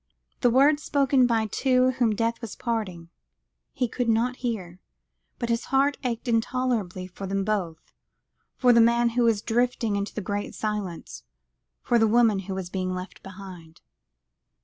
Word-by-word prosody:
The 245 - +3
words 285 +5 +4
spoken 275 -3 +2
by 225 -2 +1
the 215 - -9
two 255 -1 +2
whom 240 -4 +1
death 230 +2 -1
was 230 -3 -7
parting, 190 -8 -4 0.6
he 255 -3 -1
could 240 +1 -2
not 240 +3 +1
hear, 190 -8 -4 0.6
but 235 - -3
his 230 0 0
heart 275 +2 +2
ached 240 0 -3
intolerably 225 -5 -1
for 185 +2 -8
them 195 +1 -1
both, 185 -6 -3 0.6
for 250 -2 +4
the 235 - +6
man 235 +1 +4
who 240 +1 0
was 225 -3 +2
drifting 235 -2 0
into 200 0 -3
the - - -2
Great 205 +1 -4
Silence, 185 - -4 0.6
for 240 - +2
the 225 - +4
woman 225 -2 +3
who 190 0 -5
was 185 -2 -5
being 185 -1 -2
left 185 +1 -8
behind. 185 -4 -11
225 Hz, 165 wpm, -25 LUFS, 195-245 Hz, 0.6 s, the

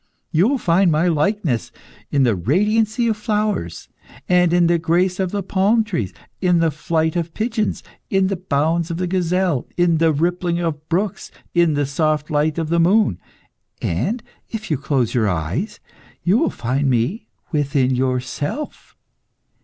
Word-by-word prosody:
You 175 +5 +4
will 280 +2 +1
find 180 -4 +3
my 160 +3 +2
likeness 160 - 0 0.4
in 140 -2 +2
the 120 -5 +3
radiancy 215 - +1
of 220 -2 0
flowers, 210 - -2 0.4
and 180 -1 +4
in 175 0 +4
the 170 0 +3
grace 180 +3 +1
of 190 -2 0
the 200 +1 -3
palm 200 +5 +2
trees, 145 - -3 0.3
in 180 -2 +3
the 165 -1 +2
flight 160 +2 -1
of 170 -1 -3
pigeons, 220 -1 -1 0.3
in 195 -1 +2
the 195 +1 0
bounds 165 -1 0
of 165 - -3
the 180 - -1
gazelle, 180 -4 0
in 175 -2 +3
the 165 -1 +4
rippling 170 +3 0
of 155 -3 -3
brooks, 190 +2 -1 0.2
in 170 -3 +3
the 145 0 +1
soft 155 +2 0
light 150 +1 +1
of 165 -2 -2
the 170 +1 +2
moon, 175 - +3 0.6
and 200 - -1 0.3
if 215 -4 -6
you 150 - +2
close 135 -5 0
your 110 -4 +2
eyes, 100 - -3 0.4
you 180 +3 +3
will 330 - +2
find 135 +4 -1
me 125 - 0 0.2
within 140 -4 +1
yourself. 130 - -3
170 Hz, 160 wpm, -20 LUFS, 145-190 Hz, 0.6 s, You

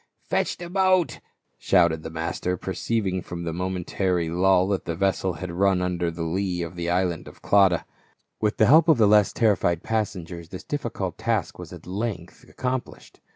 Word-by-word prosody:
" - - -52
Fetch - - +1
in 175 - -8
the - - -8
boat," 185 -2 +2 0.4
shouted 85 -4 +3
the 80 - -6
master, 85 +3 -3
perceiving 95 +1 -2
from 85 0 -7
the 85 -1 -3
momentary 90 -1 -1
lull 90 +2 +3
that 100 -2 -1
the 85 - -3
vessel 95 0 0
had 90 0 -6
run 95 +1 +2
under 90 -1 -1
the 85 0 -5
lee 90 +1 -1
of 85 +1 -7
the 85 0 -3
island 90 -2 0
of - - -14
Clauda. 95 -4 +4 0.5
With 105 0 0
the - - +5
help 155 +5 +6
of 160 -5 +5
the 110 -2 +5
less 105 -1 +5
terrified 95 -6 +1
passengers 90 -6 -3
this 95 - -8
difficult 115 -11 -4
task 110 -5 -1
was - - -9
at - - -11
length 95 -2 -5
accomplished. 130 0 -5
95 Hz, 185 wpm, -25 LUFS, 85-105 Hz, 0.5 s, help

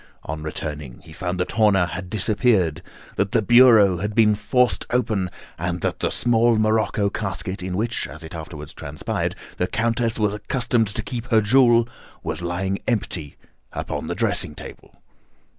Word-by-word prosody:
On 80 +1 -5
returning, 75 -4 -6
he 80 - -14
found 90 +2 -3
that 90 - -1
Horner 105 -5 +4
had 90 +1 -6
disappeared, 105 - +1 0.4
that 100 +2 0
the 115 - +4
bureau 115 -5 +6
had 105 +4 -3
been 110 -2 +5
forced 125 +4 +1
open, 110 -7 0 0.3
and 85 0 -2
that - - -2
the - - 0
small 120 -1 +3
morocco 110 -2 +1
casket 95 -2 -4
in 90 0 -3
which, 115 +2 -1
as 75 +2 -9
it 80 - -9
afterwards 80 -1 -8
transpired, 75 0 -3 0.2
the - - 0
Countess 115 0 0
was 105 -2 +1
accustomed 115 +1 0
to 105 +2 -4
keep 120 +1 -5
her 115 -3 +4
jewel, 120 +1 +4 0.4
was - - -3
lying 95 +3 -2
empty 90 - -2 0.4
upon - - -4
the - - -3
dressing 75 - -1
table. - - -11
105 Hz, 160 wpm, -22 LUFS, 90-115 Hz, 0.4 s, bureau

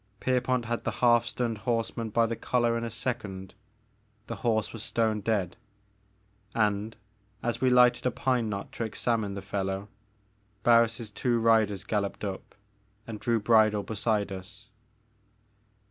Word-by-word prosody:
Pierpont 125 -1 +1
had 120 +1 -2
the - - 0 0.2
half 120 -1 +5
stunned 115 -2 -2
horseman 115 0 -2
by 115 +2 +3
the 115 0 -2
collar 120 0 +1
in 115 - -2
a 115 - -2
second, 105 -5 -4 0.4
— - - -40
^the - - -4
horse 110 -2 0
was 115 - -6
stone 110 -2 0
dead, 100 -4 -1 0.5
— 100 0 -36
and, 105 0 0 0.5
as 120 0 -2
we 130 - +4
lighted 125 0 +5
a - - +4
pine 125 -2 0
knot 100 -1 -5
to - - -4
examine 110 -2 -1
the 100 - -6
fellow, 95 +1 -3 0.7
Barris' 115 -1 +3
two 120 +3 0
riders 110 -4 +3
galloped 105 -1 -2
up 95 -2 -5 0.5
and 110 -2 -7
drew 115 0 +1
bridle 110 -1 +4
beside 105 -1 -1
us. 105 +4 -9
110 Hz, 150 wpm, -28 LUFS, 100-115 Hz, 0.7 s, half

